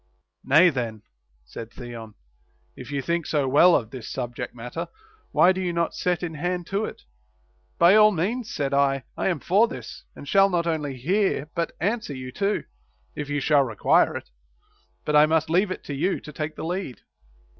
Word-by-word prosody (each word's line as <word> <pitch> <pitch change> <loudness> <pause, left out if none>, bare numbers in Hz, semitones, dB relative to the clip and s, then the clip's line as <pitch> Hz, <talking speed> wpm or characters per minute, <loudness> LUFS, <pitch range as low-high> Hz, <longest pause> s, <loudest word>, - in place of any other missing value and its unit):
Nay 155 +7 +6
then, 115 -5 -4 0.4
said 110 - -8
Theon, 115 -3 -9 0.6
if - - -10
you 140 -1 -2
think 170 +2 -1
so 145 -3 0
well 170 +7 +6
of 110 -2 -1
this 130 -4 -8
subject 125 -1 -5
matter, 125 +8 -6 0.4
why 185 - +5
do 190 0 -2
you 180 -1 -1
not 170 -1 -1
set 180 -1 -1
in 165 -2 -3
hand 175 +3 -3
to 200 +2 0
it - - -9 0.4
\ - - -40 0.3
By 175 +1 +6
all 215 0 +7
means, 210 +7 -2
said 140 -1 -2
I, 135 -1 +2
I - - -1
am 175 -5 0
for 200 +10 +3
this, 250 - -9
and 145 - -11
shall 195 +5 +5
not 175 -2 0
only 150 -5 -2
hear 160 - 0
but 170 0 -2
answer 205 -5 -2
you 130 -1 -7
too, 200 +7 -1 0.5
if 150 -1 -5
you 145 0 0
shall 145 0 +4
require 115 -6 +2
it. - - -11 0.7
But - - -1
Τ 150 0 +6
must 160 0 +1
leave 185 +4 +3
it 185 - -5
to 145 - -6
you 165 +8 0
to 150 - -11
take 155 +1 -4
the - - -6
lead. 175 -6 -4
155 Hz, 195 wpm, -24 LUFS, 135-180 Hz, 0.7 s, all